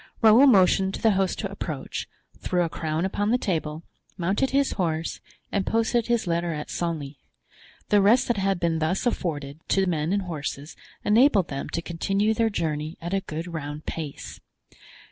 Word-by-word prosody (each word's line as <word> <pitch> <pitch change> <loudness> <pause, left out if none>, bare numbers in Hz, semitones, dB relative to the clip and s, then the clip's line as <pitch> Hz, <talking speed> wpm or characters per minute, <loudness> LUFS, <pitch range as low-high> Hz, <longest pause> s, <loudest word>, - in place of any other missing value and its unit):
Raoul 225 +6 +8
motioned 190 -4 +4
to - - -8
the 225 - +5
host 190 -1 0
to - - -4
approach, - - -5 0.3
threw 180 -1 0
a 165 - -1
crown 160 +2 -2
upon 205 +2 -1
the 245 - +3
table, 160 -7 -2 0.3
mounted 195 +9 +1
his 275 0 +2
horse, 165 -3 -2 0.3
and 200 - +1
posted 230 +2 +1
his 235 -1 +1
letter 170 -1 0
at 150 - -6
Senlis. 155 -5 -3 0.7
The 205 -1 +5
rest 220 +6 +4
that 240 - +1
had 195 -1 0
been 165 -2 0
thus 160 +8 0
afforded 150 - -2
to 195 0 +2
men 165 -2 -1
and 200 0 +1
horses 150 -3 -5 0.3
enabled 215 - +4
them 135 0 -4
to 170 - -3
continue 195 +6 0
their 225 0 +2
journey 155 -4 -3
at 170 +2 -5
a 195 - +1
good 160 -1 -5
round 150 -1 -5
pace. 155 -4 -6
180 Hz, 175 wpm, -25 LUFS, 160-205 Hz, 0.7 s, Raoul